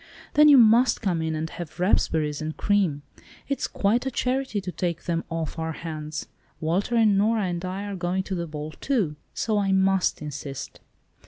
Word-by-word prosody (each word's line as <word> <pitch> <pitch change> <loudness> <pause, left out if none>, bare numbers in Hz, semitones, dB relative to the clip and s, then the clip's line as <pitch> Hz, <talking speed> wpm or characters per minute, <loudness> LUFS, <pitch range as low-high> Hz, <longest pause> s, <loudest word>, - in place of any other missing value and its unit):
"Then 300 0 +7
you 285 - +9
must 235 +2 +5
come 175 -5 0
in 160 0 -1
and 155 +1 -2
have 170 0 -8
raspberries 160 -5 +1
and 155 0 -4
cream. 185 -9 +1 0.4
It's 275 - -1
quite 210 +5 +1
a 265 - -1
charity 255 -3 -1
to 185 -2 -5
take 175 -2 -3
them 170 -1 -1
off 165 -1 -4
our 160 0 -2
hands. 155 -2 -5 0.3
Walter 180 +9 0
and 215 -4 +4
Nora 220 +1 +2
and 175 -2 -2
I 185 +2 -4
are 205 -1 -4
going 180 +1 -1
to 190 - -5
the 170 -2 -2
ball 150 0 -6
too, 200 - -1 0.2
so 215 -2 0
I 195 -1 +1
must 190 -1 +2
insist." 145 -2 -7
180 Hz, 185 wpm, -25 LUFS, 160-210 Hz, 0.4 s, you